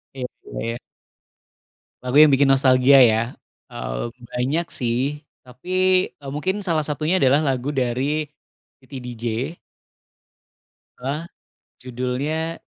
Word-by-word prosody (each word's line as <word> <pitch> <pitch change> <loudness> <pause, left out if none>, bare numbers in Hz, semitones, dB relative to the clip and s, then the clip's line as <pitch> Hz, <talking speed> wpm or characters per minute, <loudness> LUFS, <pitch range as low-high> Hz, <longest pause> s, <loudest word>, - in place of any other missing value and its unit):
Iya 130 - -4 0.2
juga, - - -8
ya. 120 - -5 1.3
Lagu 125 0 -3
yang 155 - +8
bikin 140 +1 +4
nostalgia, 135 0 +5
ya, 110 -2 +5 0.5
eee, - - -4 0.3
banyak, 135 +8 -1
sih, 135 +5 -2 0.2
tapi, 125 +6 -14 0.4
eee, 140 -2 -10
mungkin 185 +8 -2
salah 165 -5 0
satunya 155 +5 0
adalah 140 -2 +4
lagu 135 -1 -1
dari 135 +4 -1 0.5
Titi 130 0 -10
DJ 120 +5 -4 1.4
bahwa 145 +7 -4 0.5
judulnya 130 +6 -3
135 Hz, 110 wpm, -22 LUFS, 125-150 Hz, 1.4 s, yang